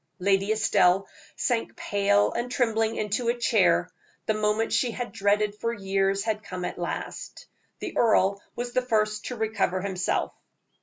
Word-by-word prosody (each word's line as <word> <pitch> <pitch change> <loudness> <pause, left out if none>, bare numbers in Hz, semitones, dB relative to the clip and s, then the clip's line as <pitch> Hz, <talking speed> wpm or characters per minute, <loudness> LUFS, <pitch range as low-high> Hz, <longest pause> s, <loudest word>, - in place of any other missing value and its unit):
Lady 195 +2 +2
Estelle 195 -3 +3 0.3
sank 235 -3 -1
pale 205 0 +2
and 240 +1 -3
trembling 225 -3 +1
into 215 +3 -1
a 240 - +1
chair 190 -6 +3 0.3
the 220 - +1
moment 215 +1 0
she 250 - +2
had 240 +1 -5
dreaded 205 +1 +1
for 230 +2 -2
years 195 -2 0
had 215 -1 -1
come 185 -3 -6
at - - -5
last. 175 - -5 0.3
The - - -6
earl 200 -4 +3
was 240 0 -4
the 255 - +1
first 215 -3 0
to 250 - -4
recover 220 -5 0
himself. 185 -1 -1
210 Hz, 155 wpm, -26 LUFS, 195-225 Hz, 0.3 s, Estelle